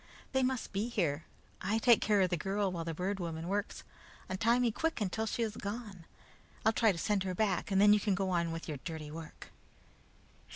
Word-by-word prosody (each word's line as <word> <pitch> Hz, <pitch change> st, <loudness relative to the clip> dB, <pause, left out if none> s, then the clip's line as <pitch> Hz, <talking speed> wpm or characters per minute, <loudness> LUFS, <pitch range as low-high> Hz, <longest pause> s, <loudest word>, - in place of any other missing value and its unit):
They 265 Hz, -, +2 dB
must 255 Hz, -4 st, -1 dB
be 205 Hz, +4 st, -1 dB
here. 170 Hz, -10 st, 0 dB, 0.4 s
I 200 Hz, +4 st, +1 dB
take 235 Hz, 0 st, +5 dB
care 210 Hz, -2 st, +3 dB
of 185 Hz, -1 st, +2 dB
the -, -, +3 dB
girl 195 Hz, +3 st, -1 dB
while 170 Hz, -2 st, -3 dB
the 165 Hz, -, -3 dB
Bird 190 Hz, +4 st, -2 dB
Woman 165 Hz, -1 st, -4 dB
works. 205 Hz, +3 st, -2 dB, 0.5 s
Untie 225 Hz, +5 st, +2 dB
me 245 Hz, -2 st, +2 dB
quick 325 Hz, +7 st, -1 dB
until 220 Hz, +2 st, -1 dB
she 230 Hz, -, -1 dB
is 220 Hz, -1 st, -3 dB
gone. 205 Hz, -4 st, -6 dB, 0.6 s
I'll 220 Hz, -, +5 dB
try 225 Hz, -1 st, +4 dB
to 180 Hz, -, -5 dB
send 205 Hz, +3 st, +1 dB
her 185 Hz, -1 st, -2 dB
back, 200 Hz, -2 st, 0 dB
and 195 Hz, -1 st, +2 dB
then 205 Hz, +1 st, +7 dB
you 210 Hz, -, +4 dB
can 200 Hz, -1 st, +1 dB
go 190 Hz, 0 st, -1 dB
on 170 Hz, -2 st, +1 dB
with 165 Hz, 0 st, -5 dB
your 150 Hz, -3 st, -3 dB
dirty 160 Hz, -3 st, -6 dB
work." 160 Hz, 0 st, -9 dB
195 Hz, 215 wpm, -33 LUFS, 175-220 Hz, 0.6 s, then